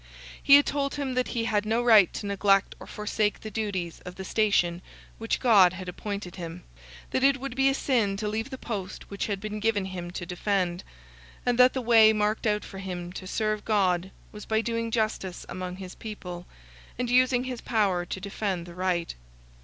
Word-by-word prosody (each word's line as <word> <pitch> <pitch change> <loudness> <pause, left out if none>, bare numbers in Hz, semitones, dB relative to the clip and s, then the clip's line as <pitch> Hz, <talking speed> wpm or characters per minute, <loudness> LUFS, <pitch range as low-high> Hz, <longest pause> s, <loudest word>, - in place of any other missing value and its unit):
He 280 - +8
had 285 - +6
told 280 -1 -1
him 280 -3 -2
that 255 0 0
he 235 -2 -2
had 210 -2 +1
no 225 +3 0
right 215 -7 +6
to - - -5
neglect 200 0 +2
or - - -11
forsake 210 0 -1
the 215 - -7
duties 195 -6 -3
of 180 0 -8
the 190 - -7
station 185 -5 +1 0.4
which 225 0 -1
God 200 -8 +6
had 185 0 -7
appointed 195 0 -5
him; 170 0 -7 0.5
that 260 - 0
it 275 0 +4
would 270 -1 -5
be 270 +1 +4
a 270 - +1
sin 225 -9 +1
to 210 +1 -3
leave 220 +4 -2
the 260 - -6
post 200 -7 -6
which 200 - -3
had 200 -2 -2
been 215 +1 -5
given 210 -2 +1
him 180 -2 -6
to 175 0 -6
defend; 180 0 -1 0.6
and 245 0 +1
that 250 0 +7
the 260 - -2
way 225 -2 +7
marked 215 +1 0
out 210 0 0
for 195 - -9
him 180 -2 -6
to 185 - -7
serve 215 +1 -1
God 190 -4 +1 0.2
was 210 -1 -10
by 220 0 +2
doing 230 0 -2
justice 215 -5 -2
among 180 -1 -5
his 185 -1 -8
people, 180 -5 -8 0.5
and 250 0 -1
using 250 0 +3
his 255 -2 -5
power 200 -6 +1
to 175 - -5
defend 195 -2 -3
the 175 - -11
right. 180 -1 -1
210 Hz, 200 wpm, -27 LUFS, 185-230 Hz, 0.6 s, He